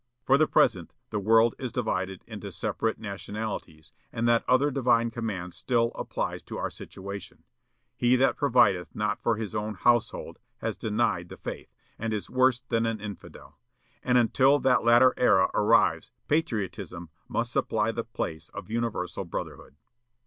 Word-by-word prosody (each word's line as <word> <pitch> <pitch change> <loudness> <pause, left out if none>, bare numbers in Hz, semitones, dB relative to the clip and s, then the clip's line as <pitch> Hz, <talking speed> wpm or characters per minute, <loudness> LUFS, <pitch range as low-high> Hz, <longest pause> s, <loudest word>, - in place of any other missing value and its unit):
For 135 - +4
the 155 - +4
present, - - +2 0.2
the 105 - -1
world 115 +3 +4
is 125 -3 -4
divided 95 -6 -2
into 105 -3 -8
separate 110 +4 -2
nationalities; 100 -6 -6 0.2
and 115 +1 -1
that 115 -1 +3
other 135 +3 +4
divine 120 -3 +2
command 105 -7 -4
still 115 -2 0
applies - - -4
to - - -6
our - - -3
situation, 100 0 -9 0.5
'He 120 +1 +3
that 130 +1 +3
provideth 110 -10 +2
not 105 0 -1
for 115 - +1
his 110 -1 -5
own 105 0 -3
household 120 +2 +1 0.2
has - - -3
denied 105 -5 -1
the - - -10
faith, - - -7 0.3
and 115 0 -2
is 105 - -6
worse 130 -1 +3
than 115 -2 0
an 115 -1 -2
infidel,' 105 -1 -10 0.4
and 125 0 +2
until 130 +4 +4
that 130 -3 +2
latter 120 +2 +6
era 95 -6 +4
arrives 105 - +3 0.2
patriotism 100 - -2 0.2
must - - -2
supply - - +1
the - - -3
place 80 0 -5
of - - -8
universal 115 -6 -2
brotherhood." 85 -4 -7
115 Hz, 155 wpm, -27 LUFS, 100-120 Hz, 0.5 s, latter